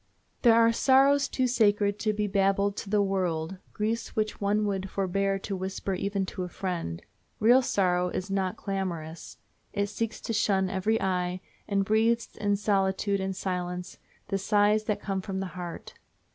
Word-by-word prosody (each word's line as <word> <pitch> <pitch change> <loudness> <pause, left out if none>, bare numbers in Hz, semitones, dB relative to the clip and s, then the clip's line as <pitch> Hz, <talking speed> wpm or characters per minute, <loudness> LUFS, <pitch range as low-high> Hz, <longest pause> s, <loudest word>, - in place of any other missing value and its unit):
There 235 -2 +6
are 230 0 +5
sorrows 270 +3 +4
too 260 - 0
sacred 205 -4 +2
to 215 - +1
be 210 0 -1
babbled 200 0 +2
to - - -5
the 205 0 +3
world, 185 -3 -1
griefs 220 +2 -2
which 215 -1 -1
one 205 +1 +1
would 195 -1 -2
forbear 195 +1 0
to 195 +1 -4
whisper 190 +1 -3
even 195 +1 -1
to 185 - -6
a 180 - -3
friend. 175 - -4 0.4
Real 240 +4 +6
sorrow 180 -6 +1
is 185 +2 -4
not 190 -2 -1
clamorous. 170 -5 -4 0.4
It 200 0 0
seeks 225 +2 -3
to 230 - -3
shun 195 -4 +2
every 210 +4 +1
eye, 180 -1 -1 0.3
and 200 -1 +1
breathes 225 +2 +1
in 205 -1 +1
solitude 200 0 +1
and 190 0 -2
silence 180 -1 -4 0.3
the 195 -1 0
sighs 210 +1 +3
that 210 -2 -1
come 195 -2 -2
from 190 0 -4
the 195 - -2
heart. 175 -2 -7
195 Hz, 170 wpm, -28 LUFS, 190-210 Hz, 0.4 s, There